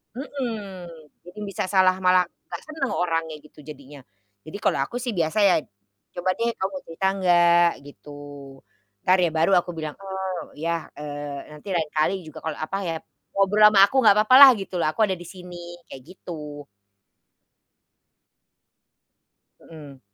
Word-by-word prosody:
Mhm. 220 -10 -6 0.4
Jadi 180 +4 -12
bisa 200 -2 -4
salah 185 -1 +3
malah 185 0 +4 0.2
nggak - - -7
senang 310 -4 -4
orangnya 165 -2 -1
gitu 150 0 -19
jadinya. 145 -1 -12 0.5
Jadi 155 - -7
kalau - - +1
aku 140 - -3
sih 245 0 -3
biasa 170 0 -1
ya, 195 - +5 0.6
"Coba 180 +1 0
deh, 235 0 -1
kamu 190 0 -4
cerita 165 +4 -2
nggak?" 175 -1 +4
Gitu. 145 0 -13 0.9
Entar 185 +1 +4
ya 175 -2 +2
baru 160 +4 +1
aku 175 - -6
bilang, 155 -2 -6
"Oh, 190 -2 -6
ya, 165 +1 -3
eee, 145 0 -7
nanti 150 +6 -14
lain 160 -3 -1
kali 170 +4 0
juga, 155 - -11
kalau 160 -1 -3
apa 155 +5 -4
ya, 165 - -2 0.4
ngobrol 205 +2 +5
sama 210 -2 +4
aku 200 +7 +2
nggak 210 -5 +6
apa-apa 215 +4 +4
lah," 280 -1 +12
gitu 190 -3 -5
loh, 160 - +1
"aku 190 +8 +1
ada 190 -3 +1
di 175 - -11
sini." 175 -2 -10 0.2
Kayak 135 - -9
gitu. 150 -5 -9 2.9
Mhm. 145 -5 -13
175 Hz, 155 wpm, -23 LUFS, 155-195 Hz, 2.9 s, lah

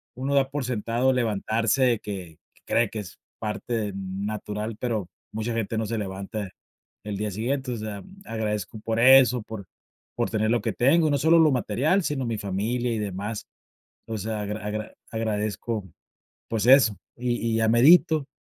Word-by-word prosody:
Uno 135 +2 -2
da 135 -1 +3
por 145 -3 -2
sentado 120 +2 +1
levantarse 115 +1 +1
que 95 -6 -7 0.2
que - - -26
cree 115 -2 +2
que 110 - -7
es 100 0 -9 0.2
parte 105 -1 -3
natural, 105 +3 -4
pero 110 -7 -2 0.2
mucha 110 +2 -3
gente 115 0 -2
no 110 - 0
se 115 - -2
levanta 100 +1 -5 0.6
el 105 -1 -4
día 105 0 -2
siguiente, 125 +6 -2
o - - -2
sea, 105 -2 -5 0.2
agradezco 110 - -3
por 115 +1 -1
eso, 125 -1 +7
por 110 -2 -8 0.5
por - - 0
tener 110 0 +1
lo 120 0 +2
que - - -1
tengo, 155 +6 +4
no 145 - +3
solo 160 +4 +5
lo 160 -2 +6
material, 130 - +1
sino 135 -5 -1
mi 115 -1 -1
familia 110 +6 -1
y 115 - -1
demás. 105 +1 -4 0.6
O 110 -1 -4
sea, 105 +1 -3
agra 105 +1 -4
agra 105 0 -4 0.2
agradezco, 110 -1 -2 0.6
pues 110 -1 -1
eso, 125 -6 +6 0.2
y 120 0 -1 0.2
y - - +2
ya 110 - +2
medito, 150 +5 +5
110 Hz, 170 wpm, -25 LUFS, 105-125 Hz, 0.6 s, eso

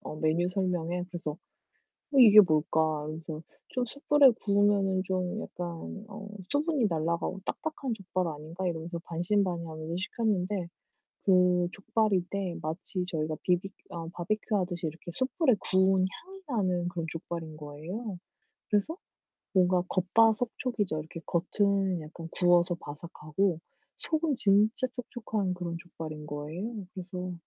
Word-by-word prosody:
어 155 - -7
메뉴 165 +3 +2
설명엔. 180 -2 -1
그래서 170 -4 -3 0.6
'어, 280 - -3
이게 215 -4 +11
뭘까?' 155 -3 +3 0.3
이러면서 155 0 -6 0.3
좀 250 -1 -1
'숯불에 280 0 +5
구우면은 200 -2 +3
좀 185 +3 -1
약간 175 0 -5 0.4
어 205 0 -8 0.2
수분이 290 -4 +2
날라가고 170 +3 -1
딱딱한 295 -6 -2
족발 185 -3 -2
아닌가?' 160 +5 -5
이러면서 170 +1 -4
반신반의하면서 170 -2 -1
시켰는데 190 -2 -1 0.5
그 180 -2 +4
족발인데 195 -4 0
마치 175 +3 -3
저희가 155 -3 -1
비비 180 +2 +1 0.2
아 165 -1 -5
바비큐 210 +4 -1
하듯이 175 -3 -1
이렇게 165 +2 -9
숯불에 260 - +2 0.2
구운 190 0 +5 0.2
향이 385 +1 -12
나는 185 -7 +1
그런 170 -2 -3
족발인 165 -1 -5
거예요. 175 +8 -6 0.5
그래서 210 - +1 0.6
뭔가 180 -1 +4
겉바속촉이죠. 220 -1 +2
이렇게 160 +2 -7
겉은 190 0 +1
약간 165 +2 -8
구워서 175 -1 +4
바삭하고 165 +3 -2 0.4
속은 315 -3 0
진짜 210 +5 +4
촉촉한 220 -6 -2
그런 170 -1 -4
족발인 155 -3 -7
거예요. 180 +9 -5
그래서 180 -1 -5
180 Hz, 310 characters per minute, -30 LUFS, 170-210 Hz, 0.6 s, 이게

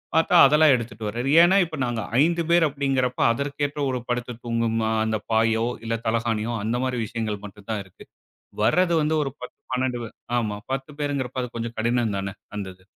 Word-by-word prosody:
பார்த்தா 165 +2 +3
அதெல்லாம் 150 0 +5
எடுத்துட்டுவராரு. 115 +1 -4
ஏன்னா, 185 +3 +5
இப்போ 160 -2 -7
நாங்க 120 -2 -2 0.2
5 170 +2 +2
பேரு 170 -1 +5
அப்டிங்கிறப்ப 135 -3 -1
அதற்கேற்ற 145 +3 -2
ஒரு 125 - -2
படுத்து 120 0 -2
தூங்கும், 115 -1 0 0.3
அந்த 110 -1 -1
பாயோ 110 0 +2 0.2
இல்ல 115 0 -1
தலகாணியோ 115 0 0
அந்த 120 +3 0
மாரி 125 -2 -2
விஷயங்கள் 110 -2 -4
மட்டும் 100 0 -13
தான் 105 -2 -1
இருக்கு. 95 - -16 0.6
வர்றது 170 +9 +3
வந்து 150 +1 +1
ஒரு 135 - -2
10 125 - -9 0.2
12 125 -1 0 0.4
ஆமா 105 -3 -2 0.2
10 135 +2 -3
பேருங்கிறப்ப 135 -3 -2
அது 125 - -4
கொஞ்சம் 115 0 -4
கடினம் 115 -1 +1
தான 95 0 -4 0.2
அந்த 100 -2 -4
இது. 95 - -26
120 Hz, 170 wpm, -24 LUFS, 110-140 Hz, 0.6 s, அதெல்லாம்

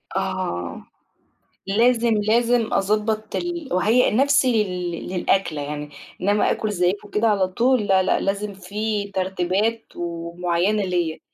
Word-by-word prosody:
آه. 85 0 -3 0.8
لازم، 235 +3 +3
لازم 230 +2 +2
أضبّط 215 +2 0
ال 345 -3 -3
وأهيّأ 220 +7 +3
نَفْسي 255 -2 +3
لل 180 -2 -4 0.2
للأكلة 180 -4 0
يعني، 150 +1 -5 0.3
إنّما 205 +3 +2
آكُل 215 - -1
زيّكم 190 +2 -1
كده 225 +2 +1
على 195 -3 +2
طول؟ 235 +4 +1
لأ، 190 -1 +4
لأ، - - +1
لازم 200 +1 -2
فيه 200 +2 -3
ترتيبات 190 +4 -1
ومعيّنة 175 +4 -1
ليّا. 175 -4 -1
200 Hz, 120 wpm, -22 LUFS, 180-220 Hz, 0.8 s, لأ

